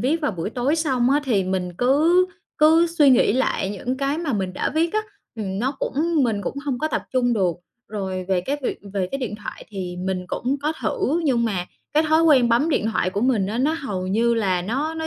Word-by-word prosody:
viết 295 +7 +1
vào 295 -6 0
buổi 175 +2 -4
tối 260 +6 0
xong 265 -6 +1
á, 290 - +3
thì 210 -7 +1
mình 185 -1 -2
cứ 315 +9 +4 0.3
cứ 320 +3 +5
suy 310 -5 +4
nghĩ 245 - +4
lại 215 -5 0
những 245 +6 -3
cái 275 +3 -1
mà 320 -5 -2
mình 190 -4 -2
đã - - -2
viết 330 +1 +1
á, 430 - +2 0.4
ừm, 195 -3 -3
nó 260 +6 0
cũng 315 +1 0
mình 220 -4 0
cũng 280 - -4
hông 265 -4 -2
có 310 - -1
tập - - -2
trung 245 -1 +2
được. 185 -6 +1 0.3
Rồi 190 -3 -4
về 185 -2 +2
cái 280 +10 -2
việc - - -2
về 190 -3 -1
cái 275 - -3
điện 235 -5 -4
thoại 210 - -8
thì 185 -4 -5
mình 185 0 -3
cũng 255 +9 -2
có 305 +2 +1
thử, 280 +8 0
nhưng 245 -5 +2
mà 185 -5 -1 0.3
cái 305 - +4
thói 315 +1 +4
quen 270 -7 +5
bấm 240 +8 +3
điện 245 -8 +1
thoại 185 - 0
của 200 - -2
mình 230 -5 +2
á, 215 +4 -3
nó 290 +5 +2
hầu 205 - -4
như 230 +5 +2
là 190 -5 0
nó 275 - -2
nó 320 0 -3
245 Hz, 240 wpm, -22 LUFS, 195-295 Hz, 0.4 s, cứ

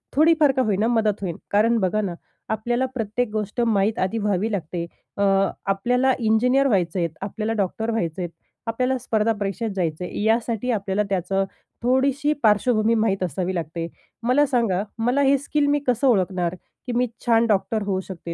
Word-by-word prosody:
थोडी 320 +3 +6
फार 290 -3 +5
का - - +4
होईना 215 -1 +1
मदत 220 -4 +1
होईल. 175 -4 -3 0.2
कारण, 225 +3 +3
बघा 210 +3 +1
ना 185 -4 -3 0.4
आपल्याला 240 +4 0
प्रत्येक 225 0 -1
गोष्ट 215 +2 -2
माहीत 215 -2 +1
आधी 190 +5 0
व्हावी 210 +1 0
लागते 170 -2 -3 0.3
अ, - - -1 0.4
आपल्याला 245 +7 +2
इंजिनिअर 250 +5 +3
व्हायचं 185 -5 +1
आहेत, 170 -1 0
आपल्याला 215 +3 -3
डॉक्टर 220 +5 -3
व्हायचं 180 -5 -2
आहेत, 175 - -3 0.4
आपल्याला 255 +3 0
स्पर्धा 225 -1 +1
परीक्षेत 205 +2 -3
जायचं 170 -2 -2
आहे. - - -5
यासाठी 230 +2 +1
आपल्याला 200 -1 0
त्याचं 195 +1 0 0.4
थोडीशी 275 +4 +2
पार्श्वभूमी 215 +1 +3
माहीत 200 -4 +1
असावी 180 +2 -2
लागते. 165 0 -3 0.4
मला 265 +5 +4
सांगा 230 -8 +1
मला 245 +5 +1
हे 275 0 +4
स्किल 285 +2 0
मी 290 0 +2
कसं 250 +2 +2
ओळखणार? 185 -5 +1 0.3
की - - -2
मी 250 - +3 0.2
छान 230 -1 +4
डॉक्टर 215 +1 +1
होऊ 190 -2 0
शकते, 170 -3 -7
215 Hz, 170 wpm, -23 LUFS, 190-245 Hz, 0.4 s, थोडी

